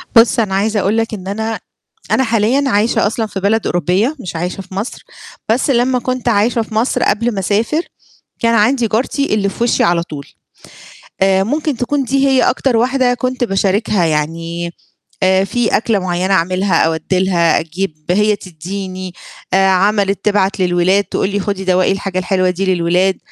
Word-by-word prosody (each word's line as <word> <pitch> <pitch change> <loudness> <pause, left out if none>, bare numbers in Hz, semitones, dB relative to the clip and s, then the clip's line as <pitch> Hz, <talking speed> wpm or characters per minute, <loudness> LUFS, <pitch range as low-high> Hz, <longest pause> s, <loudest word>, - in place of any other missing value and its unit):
بُص، 230 +1 +5
أنا 205 -4 0
عايزة 210 +2 +1
أقول 200 +3 +1
لك 225 0 -1
إن 190 -3 -7
أنا 220 +3 -3 0.5
أنا 265 - +3
حاليًا 230 +3 +1
عايشة 220 0 +2
أصلًا 225 +1 -2
في 200 - -5
بلد 210 +3 +1
أوروبية 180 - 0
مش 180 -9 -7
عايشة 180 +3 -3
في 185 0 -12
مصر، 205 +6 -5 0.5
بس 240 +6 +1
لمّا 250 0 +2
كنت 255 +1 -3
عايشة 230 +2 +2
في 220 0 -7
مصر 230 +4 +1
قبل 230 +3 +1
ما 200 - -3
أسافر، 215 - 0 0.6
كان 230 0 +2
عندي 230 +2 +2
جارتي 250 +5 0
اللي 200 -2 +1
في 230 - -2
وِشّي 240 - +2
على 170 0 +2
طول. 150 -4 -8 1.0
آآ 190 0 +3
ممكن 295 - -1
تكون 275 +3 -1
دي 275 +2 +1
هي 265 -1 +3
أكتر 255 -4 +1
واحدة 250 +1 +2
كنت 255 0 -2
باشاركها، 195 -2 +1
يعني 165 +2 -2 0.5
آآ 190 0 +3
في 235 +4 -1
أكلة 220 -2 0
معيّنة 185 +1 -1
أعملها 185 0 +1
أودّي 160 +3 -1
لها 175 -3 +2
أجيب، 165 -1 -5
هي 210 +3 +3
تدّيني، 185 +1 -7 0.4
آآ 195 0 +4
عملِت 195 +1 +1
تبعت 200 -2 +1
للولاد 180 +2 +2
تقول 195 - -2
لي: 205 0 -1
"خُدي 200 -1 -3
دوَّقي 185 0 +2
الحاجة 195 -1 -2
الحلوة 185 0 +1
دي 185 +1 0
للولاد." 180 +2 +1
200 Hz, 170 wpm, -16 LUFS, 185-230 Hz, 1.0 s, بُص